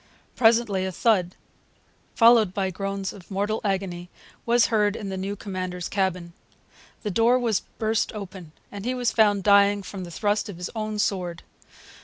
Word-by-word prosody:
Presently 225 -4 +3
a - - -3
thud, 185 -3 +1 0.8
followed 230 -5 +5
by 190 -1 -1
groans 195 +1 -4
of 190 -3 -14
mortal 205 +2 -1
agony, 185 -3 -2 0.4
was 235 0 +4
heard 210 -1 +2
in 205 -4 -5
the 190 - -4
new 195 +2 -3
commander's 185 -3 -5
cabin. 185 -3 -2 0.7
The 210 - -2
door 230 +6 +4
was 230 -5 +1 0.2
burst 220 0 0
open, 190 -5 -8 0.2
and 200 -1 -7
he 250 +3 -1
was 245 -2 0
found 205 -3 +3
dying 200 0 +4
from 190 +1 -7
the 175 - -8
thrust 205 +4 -1
of 190 - -8
his 180 +1 -5
own 215 -1 -3
sword. 180 -4 -2
200 Hz, 165 wpm, -25 LUFS, 185-215 Hz, 0.8 s, followed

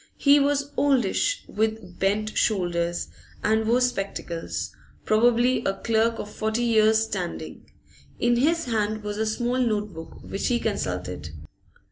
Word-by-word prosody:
He 285 0 +5
was 285 0 +1
oldish, 275 - +2
with 220 -4 -2
bent 210 +2 0
shoulders, 175 -4 0 0.3
and 220 +1 +2
wore 240 +2 +3
spectacles 195 -8 -2 0.3
probably 240 +3 +3
a 195 - +1
clerk 230 +1 +1
of - - -5
forty 220 +2 -1
years' 220 -1 +4
standing. 190 -5 -5 0.5
In 240 0 +2
his 330 +6 +2
hand 215 -2 -1
was 210 0 -4
a 220 - 0
small 240 +3 -1
note 210 -5 0
book, 165 0 -9
which 195 - -3
he 240 -1 +2
consulted. 90 - -3
220 Hz, 135 wpm, -25 LUFS, 200-240 Hz, 0.5 s, He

